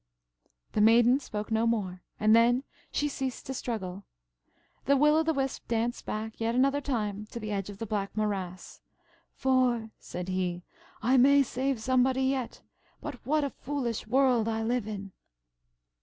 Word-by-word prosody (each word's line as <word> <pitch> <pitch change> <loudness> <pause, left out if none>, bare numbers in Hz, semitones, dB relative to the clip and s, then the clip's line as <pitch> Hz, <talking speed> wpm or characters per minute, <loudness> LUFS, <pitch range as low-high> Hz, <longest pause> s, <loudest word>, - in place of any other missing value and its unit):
The 210 - +1
Maiden 235 +4 +6
spoke 215 -5 -6
no 225 +1 +2
more, 190 -6 -1 0.2
and 215 +1 +5
then 240 +3 +4 0.3
she 295 - 0
ceased 265 -3 -4
to 265 - -4
struggle. 200 -7 -4 0.8
The 280 0 +4
Will 300 +2 +5
o' 320 - +4
the 320 0 +1
Wisp 270 -3 -2
danced 235 +1 -1
back 220 +1 -4
yet 230 +1 0
another 275 +3 +3
time 210 -6 -2
to 235 - -7
the 215 -1 -5
edge 195 -1 -2
of 200 - -8
the 225 - -4
black 205 -1 -3
morass; 190 -4 -3 0.5
"for," 250 -4 +1
said 180 +1 -6
he, 180 -1 -2 0.4
"I 255 +3 +4
may 280 +2 +6
save 265 0 -1
somebody 260 +2 +2
yet. 260 -2 -1 0.4
But 290 -5 -7
what 305 +1 +2
a 280 - -1
foolish 250 -6 -3
world 250 -2 +3
I 225 0 -1
live 235 -1 0
in!" 200 -2 -6
235 Hz, 165 wpm, -29 LUFS, 210-265 Hz, 0.8 s, Maiden